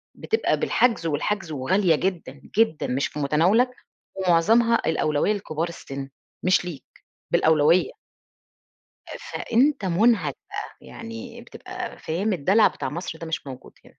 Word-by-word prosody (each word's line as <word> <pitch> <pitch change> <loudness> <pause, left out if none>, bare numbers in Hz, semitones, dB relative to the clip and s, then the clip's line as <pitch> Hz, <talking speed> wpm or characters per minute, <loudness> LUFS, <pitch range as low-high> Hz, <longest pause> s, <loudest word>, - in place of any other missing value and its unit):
بتبقى 445 - 0
بالحجز، 235 -9 +2
والحجز 170 +3 -2
وغالية 165 +5 +2
جدًا 165 -6 -3 0.2
جدًا، 225 -9 +2
مش 130 +3 0
في 150 - -8
متناولك، 175 - +3 0.5
ومعظمها 205 +6 +3
الأولوية 155 +4 +1
لكبار 170 -5 -3
السن 135 -4 -7 0.4
مش 185 -1 +3
ليك 155 -7 -7 0.5
بالأولوية. 160 - +3 1.2
فأنت 275 - 0
منهك 215 +6 +2
بقى، - - -7
يعني 230 +1 -9
بتبقى 370 +8 -8
فاهم 190 +6 -1
الدلع 190 +7 +4
بتاع - - -4
مصر 160 0 -5
ده 165 - -7
مش 160 -3 -4
موجود 130 -1 -10
هنا. - - -18
185 Hz, 125 wpm, -24 LUFS, 155-230 Hz, 1.2 s, الدلع